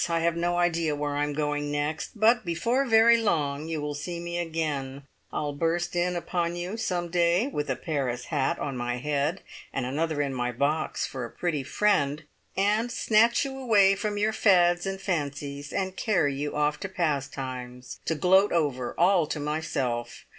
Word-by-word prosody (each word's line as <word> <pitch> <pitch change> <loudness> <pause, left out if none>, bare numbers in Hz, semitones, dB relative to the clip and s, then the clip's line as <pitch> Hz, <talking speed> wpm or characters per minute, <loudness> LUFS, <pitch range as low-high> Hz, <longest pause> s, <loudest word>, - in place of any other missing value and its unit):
I 165 0 +1
have 170 0 +1
no 175 +1 0
idea 170 -3 +1
where 145 0 -2
I 145 - 0
am 145 0 -2
going 145 0 -1
next, 150 +7 -3
but 225 +2 +4
before 230 +11 0
very 230 +1 +6
long 155 -9 0
you 160 -1 -2
will 150 0 -3
see 170 +4 -5
me 170 0 -4
again. 150 -5 -3 0.3
I'll 145 -1 -2
burst 170 +4 -1
in 175 +1 +1
upon 175 0 -1
you 175 +4 -4
some 180 -6 -2
day, 175 +4 +2
with 150 - -3
a 130 - +1
Paris 130 -7 -2
hat 140 -3 +1
on 140 -2 -4
my 120 0 -2
head 145 +6 -1 0.3
(and 135 - -2
another 155 +4 -1
in 140 -2 0
my 125 -1 -1
box 145 +6 0
for 130 -2 -5
a 120 - -5
pretty 160 -1 -2
friend!) 150 -2 +1 0.3
and 210 +5 +2
snatch 230 +5 +3
you 270 -1 -5
away 205 -6 +5
from 205 +1 -2
your 215 +1 +1
fads 175 -4 +4
and 195 0 -3
fancies, 145 -5 -3
and 190 -1 -2
carry 180 -11 +1
you 145 +2 -3
off 150 0 +1
to 195 - -5
`Pastimes,' 130 -7 -3
to 160 - 0
gloat 190 +6 +4
over, 140 -7 0
all 175 -2 +4
to 150 - -3
myself! 135 -6 -3
160 Hz, 185 wpm, -27 LUFS, 145-185 Hz, 0.3 s, very